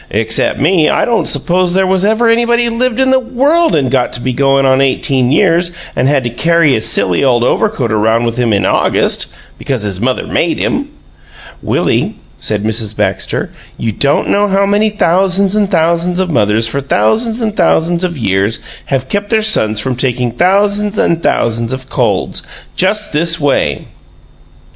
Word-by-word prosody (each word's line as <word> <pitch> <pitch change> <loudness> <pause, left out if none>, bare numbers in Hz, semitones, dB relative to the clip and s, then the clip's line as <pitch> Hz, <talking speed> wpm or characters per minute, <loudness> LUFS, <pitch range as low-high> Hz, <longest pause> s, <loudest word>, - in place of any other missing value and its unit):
Except 110 +1 0
me, 160 +2 +2
I - - +1
don't 235 -1 0
suppose 180 0 +1
there 190 0 +2
was 185 0 0
ever 220 +3 +2
anybody 235 +1 +2
lived 245 +1 -1
in 265 0 +2
the 265 - +4
world 275 - +1
and 135 -4 0
got 130 -2 +1
to - - -4
be 130 +1 -2
going 135 +1 +2
on 130 0 +3
eighteen 130 -1 +1
years 170 +1 +2
old 170 - -16 0.2
and 130 - +1
had 140 -2 +1
to 120 - -3
carry 165 +2 +2
his 110 - +1
silly 90 +7 +1
old 120 -3 +2
overcoat 140 - 0
around 110 +2 +1
with 115 -1 -2
him 120 -2 0
in 100 -2 +1
August - - +1 0.3
because 130 -6 -3
his 100 -2 -3
mother 130 +1 -1
made - - -1
him!" - - -2 0.7
"Willie," - - -1 0.2
said 105 -1 -3
Mrs. 110 -1 -2
Baxter, 100 -2 -2 0.3
"you 115 - -2
don't 140 +7 0
know 205 +1 +2
how 195 0 +1
many 205 +2 +1
thousands 195 0 +1
and 205 -2 +1
thousands 170 0 0
of 185 -2 -1
mothers 110 -3 +1
for 140 +5 -3
thousands 220 - 0
and 220 -3 -2
thousands 170 -1 +1
of 175 -3 -2
years 100 -1 0 0.3
have 130 -2 -2
kept 205 +6 -3
their 220 -1 +1
sons 110 - +1
from 125 +4 -2
taking 125 -1 -1
thousands 200 - +1
and 170 0 +1
thousands 115 -2 -1
of 130 0 -7
colds - - -1 0.3
just 210 +2 0
this 165 +2 +1
way!" 135 - 0
155 Hz, 180 wpm, -13 LUFS, 120-200 Hz, 0.7 s, the